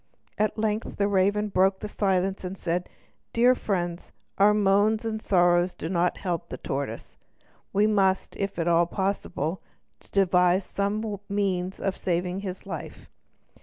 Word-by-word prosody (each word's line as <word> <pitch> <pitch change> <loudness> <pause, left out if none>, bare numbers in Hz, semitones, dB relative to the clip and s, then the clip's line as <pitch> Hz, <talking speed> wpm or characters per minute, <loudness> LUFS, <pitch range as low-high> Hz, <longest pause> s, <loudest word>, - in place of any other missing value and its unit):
At 215 +1 +1
length 215 0 -2
the 200 - +2
raven 205 +2 +2
broke 190 0 +2
the 210 - -5
silence, 195 -2 0
and 185 +1 -5
said: 175 +1 -2 0.4
"Dear 245 +2 +5
friends, 175 -7 -3 0.3
our 205 +1 +7
moans 210 +2 +3
and 220 -1 -2
sorrow 175 -2 +3
do 160 - -4
not 175 -1 +1
help 175 -3 -3
the 130 - -5
tortoise. 135 -3 -5 0.5
We 205 +2 +3
must, 195 -3 +1
if 195 0 -2
it - - -33
be - - -2
at 165 - -1
all 170 0 +4
possible, 190 -3 -2 0.5
devise 180 -1 +3
some 205 +1 -2
means 190 -2 -1
of 195 -1 -1
saving 180 +1 -1
his 190 -2 -6
life. 170 -5 -8
190 Hz, 155 wpm, -26 LUFS, 180-205 Hz, 0.5 s, our